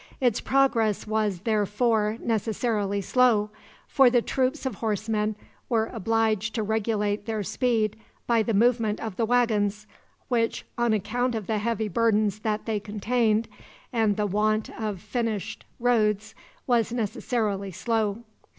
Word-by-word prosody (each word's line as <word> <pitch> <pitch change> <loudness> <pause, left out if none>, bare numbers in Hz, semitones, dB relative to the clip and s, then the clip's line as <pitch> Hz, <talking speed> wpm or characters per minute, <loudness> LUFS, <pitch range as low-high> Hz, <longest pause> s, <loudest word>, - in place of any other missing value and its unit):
Its 245 -4 +2
progress 235 -6 +2
was, 210 -4 -1
therefore, 215 0 +1
necessarily 215 -2 -1
slow, 215 -1 +3 0.4
for 270 -3 +5
the 245 0 +4
troops 260 +4 -1
of 260 - -1
horsemen 215 0 -1 0.3
were 225 -2 +1
obliged 220 -1 0
to 220 - 0
regulate 210 -1 -1
their 220 -2 -2
speed 220 -1 0 0.3
by 235 -1 +3
the 220 -1 0
movement 225 -1 +2
of 220 -4 -5
the 225 +1 0
wagons, 215 -4 +1 0.4
which, 230 -3 0
on 240 -1 +1
account 240 +4 0
of 220 -3 -3
the 215 +1 -1
heavy 220 0 -1
burdens 215 -1 +1
that 215 0 -2
they 220 -2 -1
contained, 215 +2 0 0.5
and 220 -4 +2
the 210 - +1
want 215 +2 0
of 210 -4 -4
finished 215 0 -3
roads, 220 -3 +1 0.3
was 235 -3 +2
necessarily 215 -3 -1
slow. 220 +3 -1
220 Hz, 135 wpm, -26 LUFS, 210-235 Hz, 0.5 s, for